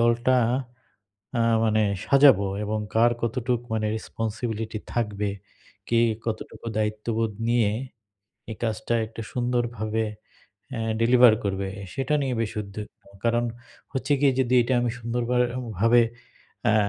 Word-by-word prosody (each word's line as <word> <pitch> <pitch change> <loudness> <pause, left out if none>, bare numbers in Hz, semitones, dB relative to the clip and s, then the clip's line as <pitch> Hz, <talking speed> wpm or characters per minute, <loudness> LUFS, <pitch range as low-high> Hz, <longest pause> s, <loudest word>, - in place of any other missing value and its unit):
দলটা 120 +2 +3 1.0
আ - - +3 0.2
মানে 110 0 +3 0.2
সাজাবো 135 -8 +6 0.2
এবং 110 +1 -1 0.2
কার 120 +1 +5
কতটুকু 120 +1 -1
মানে 110 -1 0
রেসপনসিবিলিটি 110 0 -4 0.2
থাকবে, 105 -3 -1 0.6
কে 115 0 +3 0.3
কতটুকু 115 +1 -5
দায়িত্ববোধ 110 +1 -1 0.2
নিয়ে 120 -3 +3 0.8
এই 110 - -5
কাজটা 110 +1 -1
একটা 115 +1 -8
সুন্দরভাবে 120 -3 -1 0.7
অ্যা 115 - -3 0.2
ডেলিভার 120 -1 +7
করবে 95 -1 -1 0.3
সেটা 135 +2 0
নিয়ে 130 -2 -1
বেশ 110 - -1
উদ্বিগ্ন। 105 +1 -9 0.2
কারণ 120 +1 +2 0.5
হচ্ছে 140 +2 -1
গিয়ে 140 -2 +5
যদি 125 0 +1
এটা 125 +2 0
আমি 120 -1 0
সুন্দরভার 120 +1 0 0.4
ভাবে 115 +3 +5 0.6
অ্যা 110 -2 +4
115 Hz, 120 wpm, -25 LUFS, 110-120 Hz, 1.0 s, ডেলিভার